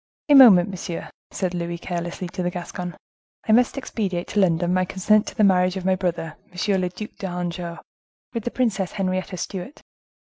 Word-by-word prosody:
"A - - +7
moment, 220 -10 +9
monsieur," 180 -3 -6 0.2
said 185 -2 -2
Louis 170 -1 -3
carelessly 175 +1 -4
to 180 - -5
the 175 - 0
Gascon; 180 0 -6 0.5
"I - - +3
must 245 +4 +4
expedite 195 -9 -3
to 210 - 0
London 175 -2 +2
my 185 0 +2
consent 200 +3 +2
to - - -6
the 215 - +2
marriage 185 -1 +3
of 185 - -5
my 190 - +3
brother, 175 -4 -3
M. 190 +2 0
le 180 - 0
Duc 200 +4 -8
d'Anjou, 175 -2 -4 0.6
with 230 -3 -3
the 240 - -1
Princess 215 -8 -1
Henrietta 185 -1 -2
Stuart." 195 - -6
185 Hz, 180 wpm, -23 LUFS, 175-200 Hz, 0.6 s, moment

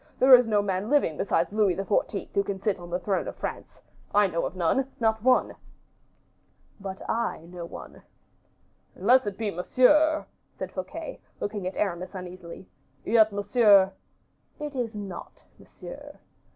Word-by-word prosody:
There 260 +1 +6
is 250 -2 +8
no 210 -2 +2
man 195 +1 -2
living 285 - +2
besides 200 +3 0
Louis 210 -4 +2
XIV. 195 +1 -1
who 200 - +2
can 200 -1 -4
sit 195 -1 -1
on 175 0 -10
the 175 - -1
throne 195 +1 -2
of - - -6
France. - - -6 0.4
I 205 0 +6
know 170 -3 -1
of - - -10
none, 185 +10 +1
not 220 -1 +1
one." 255 +2 +3 1.3
"But 195 -1 -7
I 225 -7 -2
know 175 0 -8
one." - - -11 0.9
"Unless 245 +5 +4
it 200 -1 -4
be 220 -2 -2
Monsieur," 300 - +3 0.3
said - - -5
Fouquet, - - -7 0.2
looking 205 -2 -3
at 185 - -5
Aramis 185 -1 -2
uneasily; 180 -1 -9 0.4
"yet 220 -1 +4
Monsieur 205 -1 +4 0.3
" - - -41
"It 295 -1 -5
is 235 -3 -3
not 200 -4 -8
Monsieur." - - -11
205 Hz, 155 wpm, -26 LUFS, 185-230 Hz, 1.3 s, is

